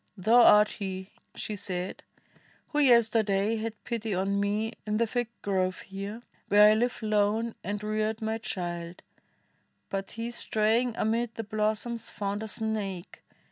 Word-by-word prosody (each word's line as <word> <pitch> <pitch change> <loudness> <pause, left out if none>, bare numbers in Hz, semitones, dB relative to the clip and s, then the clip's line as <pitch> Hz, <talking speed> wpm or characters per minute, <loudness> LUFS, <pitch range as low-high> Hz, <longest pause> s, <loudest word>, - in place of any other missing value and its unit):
thou 225 +6 +5
art 210 -2 +7
he," 190 -1 -6 0.2
she 215 - -4
said, 185 -2 -4 0.7
"who 295 - 0
yesterday 225 -5 +4
Had 220 0 -4
pity 225 -4 -2
on 195 +2 0
me 210 +3 0
in 210 0 -1
the 230 - +3
fig 240 +1 -1 0.2
grove 185 -2 0
here, 200 +4 -7 0.2
Where 210 +1 +7
I - - +5
live 240 +1 0
lone 215 +2 +1
and 205 +3 -4
reared 215 +1 -1
my 220 0 -2
child; 175 -4 -4 0.9
but 195 0 -3
he 230 +2 -4
Straying 225 +1 +1
amid 225 +1 0
the 225 - -4
blossoms 215 +2 -1
found 200 0 -3
a 220 - -4
snake. 210 -4 -4
215 Hz, 145 wpm, -28 LUFS, 200-225 Hz, 0.9 s, art